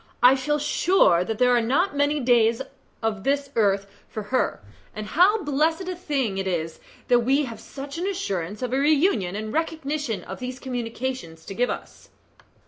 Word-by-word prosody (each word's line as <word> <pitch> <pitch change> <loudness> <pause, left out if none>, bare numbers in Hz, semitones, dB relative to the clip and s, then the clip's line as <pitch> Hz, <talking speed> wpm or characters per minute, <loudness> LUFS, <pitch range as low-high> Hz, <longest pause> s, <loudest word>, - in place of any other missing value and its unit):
I 250 +2 +8
feel 295 +3 0
sure 295 - +3
that 220 +3 -3
there 250 +1 +4
are 240 - +3
not 290 +11 +1
many 285 +1 +2
days 235 -3 +3 0.4
of 210 -3 -1
this 280 +1 0
earth 200 -3 +2 0.2
for 215 - -5
her, 255 - +1 0.4
and 215 0 -5
how 375 - +3
blessed 315 +5 +1
a 370 - -3
thing 275 - -1
it 190 - -2
is 165 -3 -2 0.3
that 245 -1 +5
we 270 +5 +2
have 230 -3 -8
such 280 +3 -8
an 365 - -1
assurance 205 - -3
of 250 0 -2
a 265 - +2
reunion 285 - +2
and 215 +1 -4
recognition 300 -7 -2
as 190 - -8
these 255 0 -5
communications 245 -8 -5
give 240 +6 -1
to - - +1
us." - - -16
255 Hz, 180 wpm, -24 LUFS, 215-295 Hz, 0.4 s, I